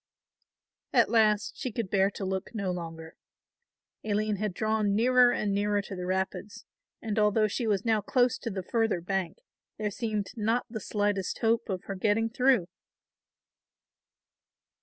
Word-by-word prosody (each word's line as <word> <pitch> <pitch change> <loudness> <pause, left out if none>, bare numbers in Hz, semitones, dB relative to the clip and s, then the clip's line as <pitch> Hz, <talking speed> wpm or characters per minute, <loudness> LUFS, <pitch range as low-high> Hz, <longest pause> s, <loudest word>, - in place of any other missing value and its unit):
At - - +4
last 215 -2 +2
she 255 - -3
could 215 -4 -4
bear 195 0 +3
to 200 -1 -6
look 190 +4 -4
no 200 -4 -1
longer. 165 -2 -7 0.9
Aline 215 0 0
had 210 0 -1
drawn 215 +1 0
nearer 250 +2 +5
and 205 -4 -1
nearer 205 +1 +1
to 200 - -7
the 180 -1 -5
rapids, 190 +4 -3 0.4
and 220 -1 -1
although 215 +1 +3
she 225 +3 -2
was 205 -1 0
now 220 -2 +2
close 245 +2 +2
to - - -4
the 190 -3 -4
further 225 -1 0
bank 185 -1 -2 0.4
there 210 -1 -2
seemed 210 -2 -3
not 225 +2 0
the 220 - -4
slightest 205 -2 -1
hope 225 -1 +1
of 185 -2 -3
her 195 - -5
getting 215 +3 +1
through. 250 -6 +3
210 Hz, 155 wpm, -28 LUFS, 195-225 Hz, 0.9 s, nearer